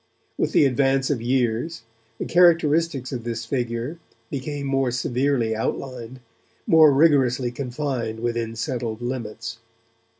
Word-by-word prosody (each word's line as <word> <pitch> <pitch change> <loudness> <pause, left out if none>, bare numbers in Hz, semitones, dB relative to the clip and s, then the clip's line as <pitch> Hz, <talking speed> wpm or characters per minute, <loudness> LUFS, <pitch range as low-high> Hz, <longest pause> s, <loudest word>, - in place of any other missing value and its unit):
With - - -1
the - - +5
advance 135 +1 +2
of 130 -5 -1
years, 125 +4 -1 0.3
the - - -4
characteristics 165 -5 +3
of 125 -3 -4
this 115 -1 -4
figure 120 +4 -3 0.3
became 140 +1 -4
more 135 -1 +1
severely 125 -1 0
outlined, 125 +2 -4 0.4
more 160 -2 +7
rigorously 135 -4 +3
confined 125 -3 -3
within 115 -1 -2
settled 120 -2 -3
limits. 115 -2 -5
125 Hz, 120 wpm, -23 LUFS, 115-140 Hz, 0.4 s, more